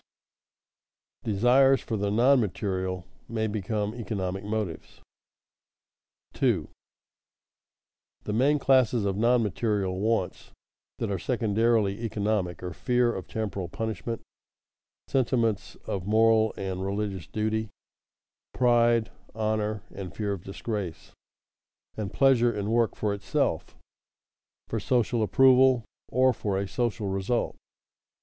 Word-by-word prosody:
[Sidenote: 110 - -1
Desires 135 +4 +5
for 115 - -3
the 100 -1 -1
non 125 +6 +4
material 95 -4 -2 0.2
may 110 -1 -1
become 105 0 -2
economic 100 -5 -4
motives] 105 -5 -4 1.3
2. - - +1 1.6
_The 105 - -2
main 140 +7 +3
classes 125 -5 +3
of 100 -1 0
non 115 +3 +3
material 100 -2 -1
wants 110 -3 -1 0.4
that 110 - -2
are 95 - -1
secondarily 110 -2 +1
economic 105 -5 -1
are 90 -1 -4
fear 125 +3 +1
of 95 - -6
temporal 100 -5 -4
punishment; 110 +2 -4 0.8
sentiments 115 -6 0
of 95 -1 -4
moral 110 0 +4
and 95 -1 -3
religious 100 -4 -3
duty; 110 0 -1 0.9
pride, 120 -2 +3 0.2
honor, 110 -2 -1
and 95 -3 -8
fear 105 -2 -1
of 95 -3 -7
disgrace; 95 -3 -5 0.8
and 105 -3 -4
pleasure 125 -3 +4
in 105 -1 -3
work 115 -1 +2
for 105 -1 -1
itself, 100 -1 -2 0.9
for - - -2
social 120 -2 +1
approval, 130 +2 +5 0.2
or 130 +1 +3
for 100 -3 -2
a 100 0 -2
social 115 0 -2
result. 95 +5 -1
110 Hz, 115 wpm, -27 LUFS, 100-120 Hz, 1.6 s, Desires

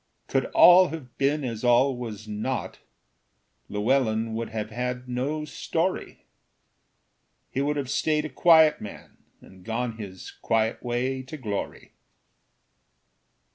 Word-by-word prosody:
Could - - 0
all 180 +1 +7
have 145 -8 -8
been 145 +2 +1
as 115 -3 -4
all 125 +2 +4
was 110 -4 -7
not, 110 +5 -4 0.9
Llewellyn 110 +1 +1
would 115 +1 -3
have 110 -1 -5
had 125 +2 -4
no 140 +5 -2
story; 165 +4 -3 1.3
He 135 - -1
would 145 +1 0
have 140 -2 -2
stayed 150 +3 0
a - - -4
quiet 160 +2 +5
man 105 - -10 0.2
And 95 -1 -16
gone 115 +1 -3
his 95 -3 -8
quiet 110 0 -1
way 125 +2 -2
to 135 +4 -9
glory. 105 -7 -5
125 Hz, 125 wpm, -26 LUFS, 110-145 Hz, 1.3 s, all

